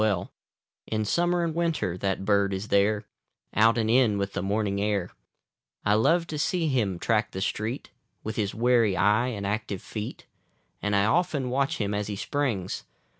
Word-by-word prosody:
B - - +4
I - - +3
li - - +3
(88) - - -10 0.6
In 110 -1 -1
summer 175 +7 +1
and 165 -1 -1
winter 160 - 0
that 95 +1 -2
bird 100 -1 +2
is 95 +3 -5
there, 105 +1 +3 0.5
Out 115 +2 +4
and 110 -1 +1
in 115 -3 +4
with 100 0 -2
the - - -2
morning 100 0 0
air: 100 -3 0 0.7
I 105 - +4
love 165 +11 +3
to 155 -2 -5
see 175 +1 +1
him 110 -9 0
track 105 +4 +1
the 95 - -4
street, 110 +6 -3 0.3
Witli 110 - -2
his 100 -3 -1
wary 115 -4 +3
eye 105 +6 +3
and 105 -5 -4
active 105 -2 -3
feet; 105 -1 -6 0.6
And 105 0 0
1 100 0 +3
often 140 -1 +1
watch 140 +4 0
him 105 -1 -1
as 105 0 -2
he 105 - -3
springs. 110 -6 -2
110 Hz, 190 wpm, -27 LUFS, 100-125 Hz, 0.7 s, B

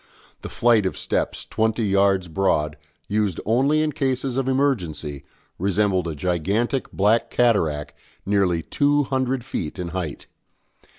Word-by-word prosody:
The - - -7
flight 115 -4 +3
of - - -5
steps, - - -2
twenty 110 +1 0
yards 100 -2 +2
broad, 80 -4 0 0.3
used 105 -4 0
only 135 +7 +3
in 155 - 0
cases 130 -2 -1
of 135 -1 -1
emergency, 90 - -1 0.4
resembled 95 -1 +1
a 80 - -4
gigantic 95 - -1
black 105 +4 +2
cataract 85 -12 +1 0.3
nearly 95 -5 +1
two 145 - +2
hundred 130 -2 -1
feet 85 - -4
in 90 -2 -4
height. 85 -4 -5
105 Hz, 130 wpm, -23 LUFS, 90-130 Hz, 0.4 s, flight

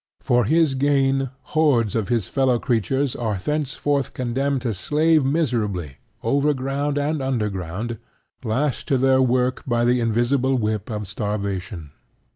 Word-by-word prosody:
For 120 -2 +2
his 160 +2 +3
gain, 135 -1 +2 0.2
hordes 140 -10 +3
of 110 -4 0
his 115 -6 0
fellow 130 -3 +2
creatures 125 +3 0
are 110 -4 -2
thenceforth 145 +3 -1
condemned 130 +2 -1
to 115 -3 -1
slave 155 - +2
miserably, 110 - -1 0.3
overground 140 0 0
and 145 +1 0
underground, 105 -3 -3 0.4
lashed 130 +5 -1
to 135 - +2
their 130 0 +4
work 125 0 +1
by 120 -1 +1
the 125 +1 +3
invisible 120 +4 +1
whip 110 -2 -2
of 105 -2 -4
starvation. 100 - -4
125 Hz, 130 wpm, -22 LUFS, 110-140 Hz, 0.4 s, their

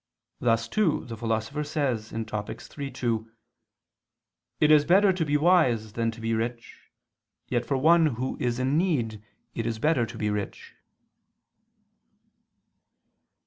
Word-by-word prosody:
Thus 115 -1 +1
too 180 - +1
the 115 -2 -6
Philosopher 115 +6 -2
says 130 -8 -2
(Topic. 110 0 -5 0.2
iii, 140 -2 -4
2): 115 -4 -2 1.3
"It 150 - +4
is 150 -1 +7
better 190 +5 +4
to 180 -2 -1
be 150 -1 +1
wise 130 - +3
than 115 0 0
to 115 +1 -8
be 115 0 -1
rich, 115 +1 -5 0.6
yet 120 -1 -1
for 135 - +1
one 165 +4 +5
who 130 -1 -3
is 120 -1 -1
in 130 +4 +1
need, 120 - -1 0.3
it 115 0 -3
is 115 -1 -2
better 130 -2 +1
to - - -9
be 105 -1 -1
rich 105 -1 -5
120 Hz, 140 wpm, -26 LUFS, 115-150 Hz, 1.3 s, is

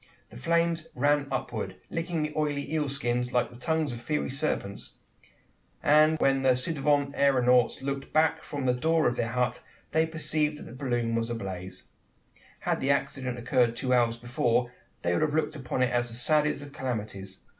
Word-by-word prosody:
The - - -12
flames 165 +4 +1
ran 145 +2 +2
upward, 105 -7 -3 0.2
licking 165 -1 -1
the 150 0 -3
oily 150 -1 -1
eel 150 -3 0
skins 125 -2 -1
like 125 0 +1
the - - -13
tongues 155 +3 0
of 120 -1 -7
fiery 150 +2 -1
serpents; 135 -8 -3 0.9
and 155 +2 +5
when 135 -2 +2
the 130 -1 +4
ci 130 +6 -2
devant 145 -1 +1
aeronauts 125 -3 +3
looked 140 0 -3
back 155 +1 +3
from 140 -2 -5
the 125 - +3
door 160 +5 +2
of 120 - 0
their 115 - -1
hut, 125 0 0 0.3
they 160 0 +3
perceived 155 -1 0
that - - -9
the - - -10
balloon 120 -3 -1
was 115 0 0
ablaze! 95 -5 -5 0.8
Had - - 0
the 135 - -1
accident 130 -3 0
occurred 120 -1 +2
two 125 +1 0
hours 120 -1 +3
before, 120 0 0 0.3
they 85 - +1
would - - +1
have 155 -1 +1
looked 155 0 0
upon 130 -2 -1
it 125 - +1
as 120 0 +1
the 115 - -4
saddest 150 +3 +2
of 145 -1 -11
calamities. 105 -7 -5
130 Hz, 185 wpm, -28 LUFS, 120-150 Hz, 0.9 s, and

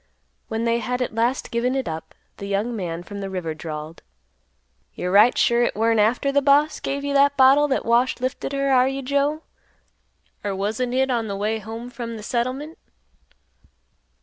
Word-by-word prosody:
When 225 0 -3
they 235 0 +1
had 250 +2 -2
at 240 - -5
last 235 +4 -1
given 245 +2 0
it 265 -2 -2
up, 160 0 -6 0.2
the 200 - -7
young 205 +4 -1
man 175 -4 -4
from 200 +2 -8
the 195 -1 -4
river 180 -4 -3
drawled, 155 0 -7 0.9
"You're 180 - -3
right 210 +5 +6
sure 235 0 +3
hit 240 - +1
weren't 225 +1 +2
after 240 +6 +2
th' 285 0 +2
boss 290 +2 +3
give 280 +1 -3
you 285 0 -2
that 280 0 +4
bottle 275 +3 +6
that 270 - -1
Wash 240 +3 +2
lifted 255 +2 -3
her, 275 0 0
are 255 -1 +5
you 270 0 -3
Joe? 285 +4 0 1.0
Or 200 -2 -2
wasn't 220 +6 -2
hit 265 +1 +1
on 230 -2 -1
th' 200 - -3
way 215 +2 -1
home 225 +3 -8
from 235 -3 -6
th' 215 - -9
settlement?" 255 +7 -3
235 Hz, 185 wpm, -23 LUFS, 210-270 Hz, 1.0 s, right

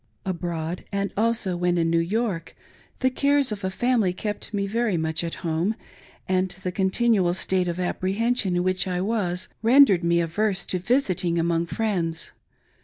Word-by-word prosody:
Abroad, 175 -2 -3
and 200 0 -2
also 225 -3 0
when 175 0 +1
in 165 -1 +1
New 165 - +3
York, 175 -2 -2 0.5
the 260 0 +3
cares 280 -1 +2
of 205 -2 -5
a 190 - 0
family 225 -2 +1
kept 210 +3 -4
me 200 -2 -1
very 220 -2 0
much 160 +1 -1
at 170 - -3
home, 170 +6 0 0.5
and 185 0 +1
the 180 - -1
con 190 +1 +1
tinual 195 -5 +2
state 185 -1 0
of 175 +1 -3
apprehension 195 +3 0
in 175 - +1
which 185 0 0
I 180 -1 -1
was, 185 -3 -1
rendered 230 -6 +6
me 170 0 +3
averse 190 +3 0
t6 185 - -1
visiting 185 -7 +1
among 170 0 +1
friends. 175 -6 -2
185 Hz, 170 wpm, -24 LUFS, 175-220 Hz, 0.5 s, rendered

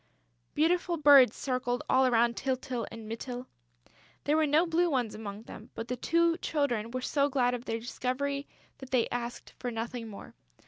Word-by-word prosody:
Beautiful 345 +2 +2
birds 280 -6 +7
circled 250 -2 -1
all 260 0 +4
round 235 0 +3
Tyltyl 255 -3 -2
and 225 -1 -9
Mytyl. 245 +3 -5 0.8
There 295 - +2
were 315 -1 +3
no 305 +4 +4
blue 345 +1 +2
ones 250 -7 0
among 210 -1 -7
them, - - -11
but 225 - -5
the 250 - -1
two 335 +6 +2
Children 245 -8 -1
were 255 +2 -4
so 280 +2 +1
glad 250 -3 +2
of 245 0 -5
their 225 - -2
discovery 275 +4 -3 0.3
that 265 - -10
they 250 -3 +2
asked 240 0 -5
for 245 - -3
nothing 230 0 -4
more. 205 -2 -10
255 Hz, 175 wpm, -30 LUFS, 235-285 Hz, 0.8 s, birds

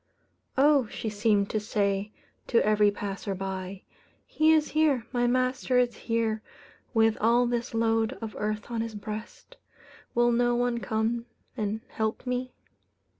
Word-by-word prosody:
"Oh!" 280 -3 +5
she 220 - -4
seemed 205 -1 +1
to 215 - 0
say 205 -1 -1 0.4
to 235 - +3
every 210 -1 +4
passerby, 195 -1 -5 0.4
"he 310 +1 +3
is 310 -1 +3
here 300 -6 +2
my 245 -1 +1
master 255 +1 +1
is 245 -1 +2
here 225 -2 -1 0.5
with 225 -2 +3
all 235 +3 +4
this 240 -1 -2
load 225 +1 +2
of 225 -5 -7
earth 215 +2 -3
on 230 -1 -1
his 225 -1 -5
breast. 215 - -8 0.6
Will 240 0 +4
no 240 0 +2
one 240 0 0
come 230 +1 -1 0.3
and 215 -1 -2
help 220 +3 -3
me?" 250 0 -2
225 Hz, 140 wpm, -28 LUFS, 210-245 Hz, 0.6 s, Oh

